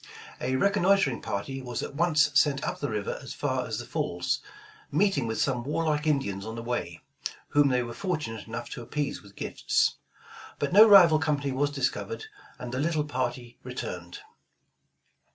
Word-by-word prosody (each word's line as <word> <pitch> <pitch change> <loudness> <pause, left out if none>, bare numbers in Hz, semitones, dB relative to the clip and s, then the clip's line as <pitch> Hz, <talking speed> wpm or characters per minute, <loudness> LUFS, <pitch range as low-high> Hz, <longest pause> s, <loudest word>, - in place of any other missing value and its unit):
A 130 +1 -1
reconnoitering 195 - +3
party 135 +7 -4
was 125 -2 -4
at - - -6
once 155 -1 +3
sent 145 -1 +3
up - - -3
the 145 - -2
river 105 -2 -3
as - - -8
far - - -1
as - - -3
the - - -5
falls, 85 0 -1 0.5
meeting 155 - +2
with 110 -1 -2
some 125 -3 0
warlike 150 +1 0
Indians 100 -10 0
on 110 +2 -6
the 115 - -6
way, 120 +1 -4 0.5
whom 145 -1 +4
they 125 -2 +2
were 120 0 -6
fortunate 155 - -3
enough 115 +1 -5
to - - -6
appease 140 +4 -3
with 100 0 -17
gifts; - - 0 0.6
but 145 +3 -2
no 215 +3 +9
rival 175 -6 +8
company 145 -3 0
was 140 +2 +1
dis 145 -2 0
covered, 455 -1 -6 0.3
and 125 -1 -7
the 130 - -2
little 155 0 0
party 125 -3 -4
returned. 90 -9 -6
135 Hz, 170 wpm, -28 LUFS, 120-155 Hz, 0.6 s, no